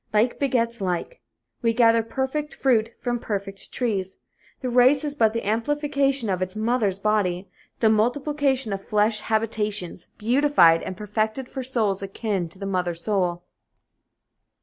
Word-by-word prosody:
Like 215 +3 +1
begets 235 -5 0
like. 185 - -3 0.4
We 230 -1 +2
gather 230 -1 +5
perfect 265 +6 -3
fruit 230 -5 +2
from 240 -1 -2
perfect 195 -3 -5
trees. 195 -6 -2 0.4
The 255 - -2
race 255 +4 +5
is 295 -1 -2
but 225 -7 +3
the 230 +1 -4
amplification 275 +2 0
of 185 -2 -1
its 185 +2 -3
mother 220 -1 +1
body, 195 -3 0 0.3
the 220 - +5
multiplication 265 +1 +1
of 195 - -4
flesh 210 +1 +1
habitations 210 -5 -2
beautified 235 - +4
and 185 - -6
perfected 215 +4 -2
for 265 - -6
souls 220 -7 0
akin 195 -2 -3
to 170 - -12
the 195 - -6
mother 180 -3 -1
soul. 175 -1 -1
220 Hz, 145 wpm, -24 LUFS, 195-255 Hz, 0.4 s, gather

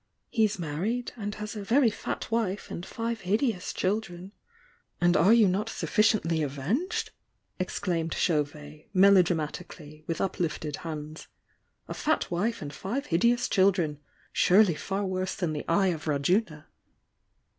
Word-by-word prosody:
— - - -51
he's 215 -3 +2
married, 180 +10 -2
and 205 -2 -5
has 210 0 -6
a 210 - -4
very 235 +3 +3
fat 220 - -5
wife 215 -4 -1
and 175 - -6
five 230 0 -3
hideous 210 0 0
children 190 -2 -2 0.3
" 475 -1 -36
"And 175 0 +3
are 180 +7 +5
you 230 -3 +6
not 200 +4 0
sufficiently 210 -10 +1
avenged?" 150 - -2 0.5
exclaimed 170 -2 -2
Chauyet, 150 -2 -2
melodramatically, 175 -4 +2
with 165 - -2
uplifted 160 -5 -2
hands. 155 -1 -7 0.6
"A - - -5
fat 315 - 0
wife 200 +3 -1
and 145 0 -7
five 250 - -3
hideous 235 +8 +2
children! 185 -7 +2 0.3
Surely 190 -1 +5
far 195 +5 -3
worse 185 0 -2
than 170 -4 -2
the 150 - -4
Eye 190 +3 +3
of 160 -3 -3
Rajuna!" 150 +2 0
185 Hz, 140 wpm, -28 LUFS, 160-215 Hz, 0.6 s, you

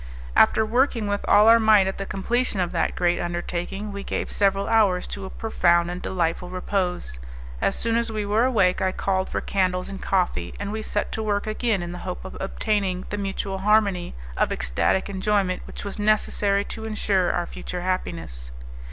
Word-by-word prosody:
After 220 - +5
working 240 0 +1
with 205 0 -1
all 210 +1 +6
our 230 0 +8
might 215 -3 +5
at 190 +1 -3
the 195 - -4
completion 230 +3 -1
of 180 -2 0
that - - 0
great 175 0 +1
undertaking, 175 +4 -3
we 200 0 -6
gave - - -3
several 195 0 +1
hours 205 -5 +3
to 200 -1 -6
a - - -6
profound 175 -6 +2
and 180 +1 -5
delightful 180 -1 -1
repose. 180 - -2 0.4
As - - +1
soon 230 0 +1
as 235 -1 0
we 215 -1 -2
were 210 +3 +2
awake 195 -8 +2
I 185 0 +1
called 190 -1 -1
for - - -2
candles 185 -2 0
and 195 -1 -7
coffee, 185 -2 0
and 200 0 -3
we 220 +1 -3
set 210 -1 -2
to 220 - -3
work 205 -2 0
again 215 -3 0
in 175 - -5
the 180 - -6
hope 180 0 -6
of 190 - -8
obtaining 195 -2 -1
the 205 - -2
mutual 195 -1 -3
harmony 200 - +2 0.2
of - - +1
ecstatic 60 - 0
enjoyment 195 -1 0
which - - -8
was 200 +1 -5
necessary 205 -1 +2
to 220 - -6
insure 205 -4 +1
our 175 - -1
future 180 +1 -6
happiness. 170 - -3
195 Hz, 190 wpm, -24 LUFS, 180-210 Hz, 0.4 s, our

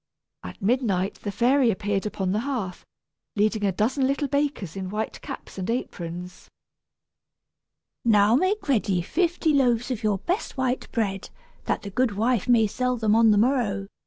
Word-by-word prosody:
At 90 - -9
midnight 200 -5 0
the 205 - -3
fairy 250 +4 +3
appeared 205 0 -1
upon 190 -3 -2
the 210 - +1
hearth, 230 -8 -4 0.5
leading 215 0 +1
a 200 - +2
dozen 250 +8 +1
little 280 +1 0
bakers 280 - -1
in 190 -1 -4
white 215 +2 -4
caps - - -8
and 185 - -4
aprons. 180 -6 -5 1.5
"Now 210 -2 +4
make 370 +8 0
ready 200 -9 +1
fifty 335 - +1
loaves 245 -3 +2
of 240 - -3
your 210 -2 +1
best 355 - -3
white 260 -1 -1
bread, 200 -4 -2 0.4
that - - -1
the 200 - -6
goodwife 230 0 +1
may 235 -3 +5
sell 250 +4 -1
them 220 -2 +2
on 225 0 +5
the 210 - +4
morrow!" 210 -5 +1
220 Hz, 160 wpm, -25 LUFS, 200-255 Hz, 1.5 s, may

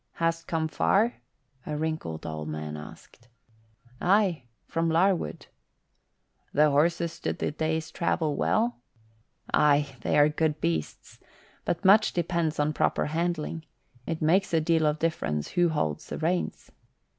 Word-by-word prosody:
"Hast 165 0 -1
come 160 -1 0
far?" 210 +8 +2 0.5
a 150 - -4
wrinkled 155 - -3
old 80 -1 -5
man 75 0 -5
asked. 75 +9 -12 0.7
"Aye, 185 - +2 0.2
from 165 0 -1
Larwood." 170 - +1 1.1
"The 150 0 +4
horses 165 +3 +2
stood - - -4
the - - -1
day's 160 +1 -2
travel 160 -4 0
well?" 230 +9 +1 0.8
"Aye, 145 -2 +3
they - - +1
are 145 0 +7
good 155 0 0
beasts. 80 - -3 0.5
But 175 +3 -2
much 210 +3 +6
depends 170 -2 -1
on 150 +1 +1
proper - - +1
handling. 165 -1 -2 0.4
It 160 -1 -3
makes 175 +3 +3
a - - +4
deal 160 0 +2
of 150 0 +1
difference 75 - -1
who 175 -1 +2
holds 80 - -2
the - - -5
reins." 175 +3 -2
160 Hz, 135 wpm, -27 LUFS, 145-170 Hz, 1.1 s, are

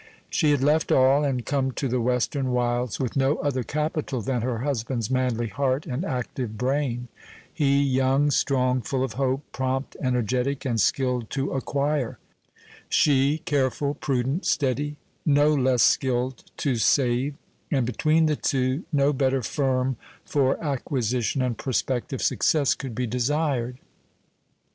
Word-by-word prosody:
She 155 - +2
had 145 -3 +2
left 150 +3 +2
all, 135 +3 +5
and 130 -4 -1
come 135 -2 0
to 135 - -2
the 125 0 0
western 125 +2 0
wilds 120 -2 0
with 130 -3 -2
no 135 +2 +2
other 135 -3 -1
capital 150 +1 -2
than 125 +1 -1
her 120 0 -1
husband's 120 -4 -2
manly 125 -3 0
heart 130 +5 -1
and 140 +1 -3
active 125 - -4
brain 125 -1 -1 0.5
he 140 -2 +2
young, 135 +2 +2
strong, 130 -2 +1
full 130 +4 -1
of 130 -4 -3
hope, 135 +3 -1
prompt, 130 +1 -2
energetic, 130 +2 0
and 115 -4 +1
skilled 125 -4 0
to 135 0 -2
acquire 140 -1 -1 0.7
she 145 +2 +3
careful, 140 -2 0
prudent, 135 +4 -1
steady, 145 +2 0 0.3
no 145 0 +4
less 130 -4 +3
skilled 130 -1 +1
to 135 -5 0
save; 125 +4 +2 0.3
and 135 -4 +1
between 155 +7 +2
the 155 -1 +2
two 130 +3 -1
no 145 -1 +3
better 135 -1 +1
firm 130 -1 0 0.3
for 135 -3 +1
acquisition 130 -3 -1
and 125 -3 -2
prospective 130 0 -2
success 145 -4 +2
could 130 -5 -7
be 125 - -1
desired. 125 +1 -1
130 Hz, 140 wpm, -25 LUFS, 125-140 Hz, 0.7 s, all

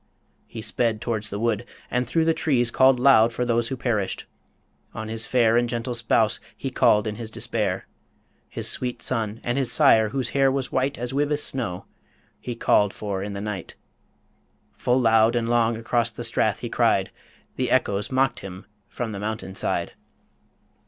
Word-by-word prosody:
He 110 -2 -8
sped 115 -2 0
towards 110 -2 -3
the 100 - -4
wood, 115 0 0 0.3
and 125 -1 0
through 160 +5 +1
the 165 - +3
trees 125 -7 +1
Called 130 0 +4
loud 120 -3 +5
for 125 +2 -2
those 120 -1 +1
who 130 - -4
perished. 110 -6 -2 0.7
On 110 0 -5
his 110 0 -2
fair 120 -2 +3
And 120 0 +1
gentle 120 +1 -3
spouse 115 -2 +1 0.2
he 135 - -4
called 110 -5 +3
in 105 -1 -4
his 115 -2 -5
despair. 105 -4 -2 0.6
His - - -3
sweet 125 -1 -2
son, 115 -3 -2
and 120 +3 -1
his 130 -4 0
sire, 110 -2 +5
whose 130 0 -2
hair 135 -1 +3
was 135 -1 -3
white 135 +2 0
As 125 +2 -4
Wyvis 145 +1 +1
snow, 115 -9 -1 0.5
he 120 - -5
called 105 -3 +2
for 100 -3 -4
in 100 +1 -5
the 100 - -5
night. 105 -4 -5 1.0
Full 125 +1 +1
loud 115 -1 +4
and 115 -1 0
long 115 -1 +2
across 115 0 +1
the 110 - -8
Strath - - 0
he - - -3
cried - - +1 0.4
The 130 -1 -1
echoes 105 -4 +1
mocked 130 0 +1
him 95 -1 -9 0.2
from 115 0 -4
the 100 - -6
mountain 105 -2 -4
side. - - -2
115 Hz, 180 wpm, -24 LUFS, 110-125 Hz, 1.0 s, loud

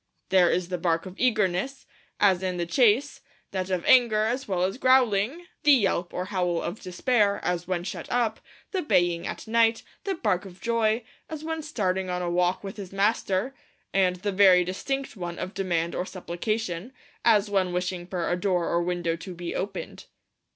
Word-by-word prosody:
'There 185 -2 +5
is 180 -1 0
the 180 -1 -2
bark 165 0 0
of 185 - -8
eagerness, 220 +1 0 0.3
as 190 -3 +4
in 185 -1 -2
the 175 - -1
chase; 240 +8 +2 0.3
that 185 -1 -3
of 185 -2 -1
anger, 235 -4 +5
as 245 +5 -1
well 185 -3 0
as 195 +7 -1
growling; 255 - +3 0.2
the 295 - +6
yelp 195 -7 +1
or 180 - -3
howl 180 -3 0
of 175 +6 -4
despair, 200 +2 +1
as 175 -1 -1
when 180 -2 -1
shut 185 - -6
up; 235 -3 +1 0.3
the 380 - -1
baying 175 - +1
at - - -6
night; 225 0 +3 0.2
the 390 -1 -1
bark 205 - 0
of 190 -2 -12
joy, 230 -1 +1 0.3
as 315 -1 -6
when 320 0 -3
starting 190 -11 -1
on 180 0 -2
a 175 - -1
walk 180 +2 +1
with 195 +1 -7
his 195 -3 -7
master; 200 +3 0 0.4
and 185 -2 +3
the 200 +3 -3
very 190 -2 +6
distinct 270 +11 -3
one 175 -3 -5
of 185 - -5
demand 170 -3 -1
or - - -1
supplication, 185 +3 -3 0.3
as 210 -3 +4
when 190 -2 +1
wishing 180 0 -3
for 180 -2 -2
a 175 - +1
door 180 -1 0
or 170 - +1
window 175 -1 -1
to 180 +2 -8
be 175 0 -5
opened.' 195 0 -5
190 Hz, 185 wpm, -26 LUFS, 180-225 Hz, 0.4 s, the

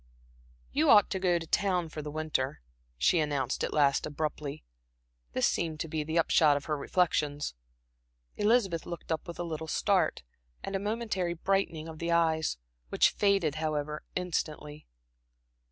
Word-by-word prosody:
"You - - +2
ought 205 -2 +7
to 190 - -1
go 180 -2 +2
to 165 - -5
town 180 -1 +1
for 155 - -6
the 150 - -6
winter," 150 -3 -2 0.4
she 165 - +3
announced 145 -4 -1
at - - -1
last 140 -2 +2
abruptly. 150 - -4 0.7
This - - +2
seemed 160 -2 -1
to - - -3
be 155 -1 -2
the 160 +2 -2
upshot 155 -3 +4
of 145 - -6
her 155 - -1
reflections. 145 - 0 0.8
Elizabeth 205 -6 +2
looked 170 -1 -7
up 160 +1 -2
with 170 - -7
a 175 - -3
little 160 -1 -5
start, 180 - +1 0.4
and 195 - -4
a - - +1
momentary 205 -4 -2
brightening 170 -3 -1
of 160 -1 -9
the 170 0 -2
eyes, 160 - +2 0.3
which - - +4
faded, 195 -7 +2
however, 150 -1 -2
instantly. 155 -4 -3
160 Hz, 155 wpm, -30 LUFS, 150-180 Hz, 0.8 s, ought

